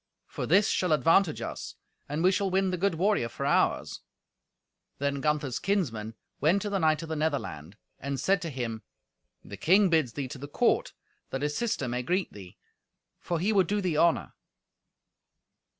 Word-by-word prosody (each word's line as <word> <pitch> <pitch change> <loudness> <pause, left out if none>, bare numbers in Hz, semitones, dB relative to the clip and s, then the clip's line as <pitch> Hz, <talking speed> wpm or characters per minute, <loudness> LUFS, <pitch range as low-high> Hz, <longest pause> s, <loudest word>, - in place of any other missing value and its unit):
For - - -5
this 195 +5 +4
shall 180 -4 +1
advantage 165 +2 +3
us, - - -6 0.3
and 150 +3 -2
we 185 - +5
shall 195 0 0
win 190 0 +1
the 180 - -1
good 195 -1 +1
warrior 185 - +1
for - - -5
ours." - - +1 1.0
Then 140 0 -1
Gunther's 150 -4 0
kinsmen 115 - -1 0.2
went 175 +7 +2
to 205 - -3
the 195 - 0
knight 155 -1 +2
of 165 - -8
the 160 - -2
Netherland, 120 - -3 0.2
and 140 0 -3
said 195 +8 +2
to 170 - -4
him, 120 -5 -4 0.6
"The 100 - -9
king 190 - +4
bids 155 -8 +2
thee 140 +1 -4
to 135 - -8
the 145 - -7
court 145 - +1 0.4
that 135 +1 -4
his 150 0 -1
sister 220 - -1
may 125 +1 -2
greet 180 +9 -1
thee, 95 -3 -12 0.6
for 170 -2 -2
he 205 +6 +1
would 190 -4 +3
do 205 +2 0
thee 180 -5 -1
honour." 170 0 +2
160 Hz, 180 wpm, -28 LUFS, 135-190 Hz, 1.0 s, we